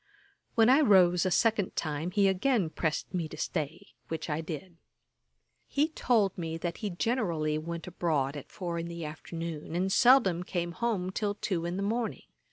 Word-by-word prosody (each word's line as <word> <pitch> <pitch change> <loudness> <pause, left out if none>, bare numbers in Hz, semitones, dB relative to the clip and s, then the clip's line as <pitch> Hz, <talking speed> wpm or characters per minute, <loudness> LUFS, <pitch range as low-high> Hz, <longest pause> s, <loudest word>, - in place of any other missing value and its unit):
When 225 -1 +5
I 265 +4 +6
rose 185 - +5
a - - +2
second 215 0 +2
time 155 +1 -2
he 195 +2 +3
again 190 -2 +1
pressed 160 +3 -2
me 170 -3 -1
to 155 - -10
stay, 155 0 -3 0.2
which 160 0 -4
I 150 +2 -1
did. 165 +2 -7 0.9
He 295 +3 +1
told 225 - +2
me, 165 -2 -4
that 170 0 -3
he 210 - -3
generally 175 -7 0
went 165 +1 -5
abroad 155 -6 -1
at 145 - -8
four 170 -2 -4
in 165 - -4
the 170 -1 -6
afternoon, 160 +1 -6
and 185 +2 0
seldom 240 -8 +5
came 175 -1 -3
home 190 -2 -1
till 205 +1 -1
two 180 -5 -2
in 175 +2 -3
the 200 - -1
morning. 225 +2 -2
175 Hz, 175 wpm, -30 LUFS, 165-205 Hz, 0.9 s, I